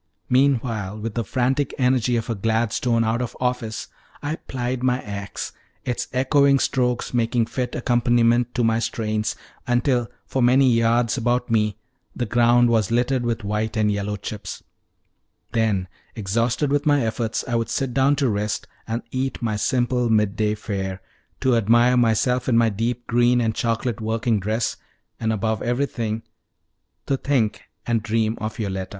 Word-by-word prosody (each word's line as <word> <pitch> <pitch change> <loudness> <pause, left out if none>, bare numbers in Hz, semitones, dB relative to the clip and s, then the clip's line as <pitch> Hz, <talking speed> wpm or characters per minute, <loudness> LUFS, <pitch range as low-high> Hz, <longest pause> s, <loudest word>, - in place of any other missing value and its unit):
"_ - - -53 0.3
Meanwhile, 120 -6 +1
with 110 0 -4
the 115 - -1
frantic 130 +5 0
energy 125 -2 +2
of 115 - -1
a 115 - -1
Gladstone 115 +2 +1
out 115 +2 0
of 120 -1 -5
office, 125 -4 -2 0.4
I 150 +2 -2
plied 125 -1 -4
my 125 0 +2
ax, 100 -2 -6 0.3
its 125 -2 -2
echoing 140 +2 +4
strokes 125 -2 0
making 115 -1 +1
fit 125 +1 -3
accompaniment 120 0 +2
to 120 - +1
my 115 0 +2
strains, 110 -2 -1 0.3
until 120 -1 +1 0.2
for 130 - -2
many 125 +1 +5
yards 115 +1 +2
about 120 0 0
me 105 -2 +1 0.4
the 120 - -1
ground 120 +1 +4
was 110 -4 +2
littered 125 +2 +1
with 115 -1 -2
white 105 +2 -2
and 105 -1 +2
yellow 100 0 -2
chips; 105 +1 -7 0.9
then, 110 -5 +1 0.3
exhausted 115 +7 0
with 145 +1 +1
my 145 -4 +3
efforts, 110 0 -2
I 120 - -3
would 115 -1 0
sit 135 -3 -1
down 135 +3 +3
to 140 -1 +1
rest 105 -1 -1 0.2
and 115 +1 -3
eat 130 +1 -2
my 110 -2 -1
simple 125 +2 +1
midday 105 0 +2
fare, 95 -3 -4 0.4
to 130 -2 +3
admire 120 +3 +4
myself 125 +2 +2
in 115 - +4
my 115 -1 +4
deep 115 +3 -2
green 120 +1 +3
and 115 -2 +1
chocolate 115 0 -1
working 110 0 0
dress, 110 +4 -1 0.4
and, 110 -1 0
above 110 0 -1
everything, 120 -3 -1 0.8
to 135 - 0
think 125 -7 0 0.2
and 115 -2 +1
dream 110 0 0
of 110 +1 -4
Yoletta. 95 -4 -3
115 Hz, 160 wpm, -23 LUFS, 110-125 Hz, 0.9 s, many